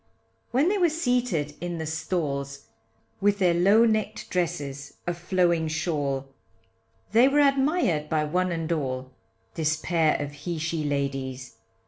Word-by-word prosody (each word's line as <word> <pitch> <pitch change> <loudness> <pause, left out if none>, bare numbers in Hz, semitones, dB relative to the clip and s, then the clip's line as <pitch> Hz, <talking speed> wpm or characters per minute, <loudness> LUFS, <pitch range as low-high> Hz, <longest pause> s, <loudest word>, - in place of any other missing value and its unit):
When 265 +6 +2
they 405 0 +1
were 350 -2 +4
seated 245 - 0
in 175 -1 -3
the 160 - -4
stalls, 140 -5 -3 0.6
With 205 0 +3
their 180 -3 +3
low 200 +7 +5
neck'd 215 -1 -1
dresses 145 -6 -3
a 175 - 0
flowing 175 -2 +1
shawl 150 -4 -1 0.9
They 235 +4 +6
were 285 +2 +3
admired 275 - +2
by 155 -1 +1
one 180 +4 0
and 165 -1 -3
all, 130 -5 -2 0.4
This 155 -1 0
pair 160 -1 +1
of 145 -1 -4
he 155 +4 -5
she 160 0 -2
ladies. 135 -3 -3
165 Hz, 140 wpm, -26 LUFS, 145-200 Hz, 0.9 s, They